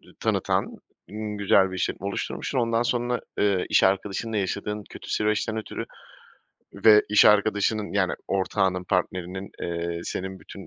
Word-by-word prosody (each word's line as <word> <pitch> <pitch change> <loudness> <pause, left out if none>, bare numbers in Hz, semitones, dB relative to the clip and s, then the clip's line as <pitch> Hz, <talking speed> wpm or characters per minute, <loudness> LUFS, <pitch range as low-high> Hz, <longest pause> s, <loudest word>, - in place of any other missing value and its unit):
iii, - - -20
tanıtan - - 0 0.6
güzel 95 -1 +4
bir 95 - -5
işletme 95 +1 -2
oluşturmuşsun. 100 +5 -3
Ondan, 115 -1 +1
eee, 120 - +1
sonra 120 0 0 0.5
iş - - +4
arkadaşınla 100 +3 0
yaşadığın 105 +1 -2
kötü - - -10
süreçten 110 +1 0
ötürü 110 - -5 0.9
ve 105 -1 +6
iş 105 - +6
arkadaşının, 105 0 +3
yani, 100 -2 +1 0.2
ortağının, 95 -1 0
partnerinin, 95 +1 -2
eee, 85 0 -3
senin 95 0 -5
bütün 100 - -11
100 Hz, 135 wpm, -25 LUFS, 95-110 Hz, 0.9 s, ve